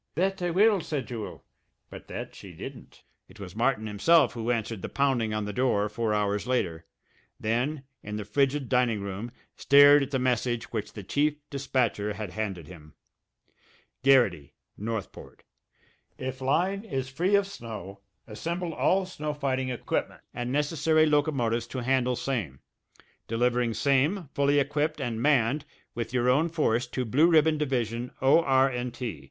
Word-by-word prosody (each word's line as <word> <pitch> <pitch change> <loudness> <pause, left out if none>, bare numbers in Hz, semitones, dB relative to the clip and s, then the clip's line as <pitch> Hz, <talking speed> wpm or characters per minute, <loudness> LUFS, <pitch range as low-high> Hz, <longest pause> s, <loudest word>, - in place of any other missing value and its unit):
"That 190 +3 0
I 175 - 0
will," 200 +2 +4
said 150 -4 -3
Jewel 115 -4 -7 0.5
but - - -10
that - - -6
she - - -11
didn't. - - -10 0.2
It - - -17
was 95 -2 -9
Martin 115 -1 +1
himself 125 +8 +3
who 115 0 -4
answered 115 -3 -1
the - - -5
pounding 130 -6 +1
on 110 -1 -2
the 105 - -5
door 105 -4 +1
four 110 +1 -2
hours 105 +1 0
later, 85 -10 -1 0.5
then, 125 +6 -1 0.2
in 105 0 -6
the 105 -1 -4
frigid 135 +5 +1
dining 125 -4 +1
room, 100 +4 -5 0.2
stared 145 +1 +7
at 140 - -2
the 140 - 0
message 125 -2 -1
which 110 -3 -4
the 105 - -8
chief 145 +9 +1 0.2
dispatcher 125 -6 -1
had 105 -3 -6
handed 95 -5 -4
him: 75 -5 -13 1.1
GARRITY, 120 - +3 0.2
NORTHPORT: 110 -2 -6 0.7
If 130 0 -5
line 185 +9 +1
is 135 - -3
free 175 +10 +1
of 200 0 +3
snow 110 - -8 0.3
assemble 170 +9 -4
all 190 +4 +2
snow 150 -5 -5
fighting 130 -2 -1
equipment 125 - -3
and 120 0 -4
necessary 155 +2 +2
locomotives 135 -7 +1
to 130 -2 -5
handle 125 0 +1
same, 105 - -3 0.7
delivering 120 0 +1
same 145 +5 +1
fully 140 +1 +2
equipped 145 +2 0
and 120 -4 -3
manned 140 0 +2 0.3
with 115 -1 -4
your 125 -1 +1
own 145 +7 +3
force 125 -7 0
to 125 +1 -3
Blue 145 +9 +4
Ribbon 160 -2 +4
Division 120 -4 -1
O.R. 135 -1 +4 0.2
& - - -13
T. 120 - -5
130 Hz, 155 wpm, -27 LUFS, 110-145 Hz, 1.1 s, stared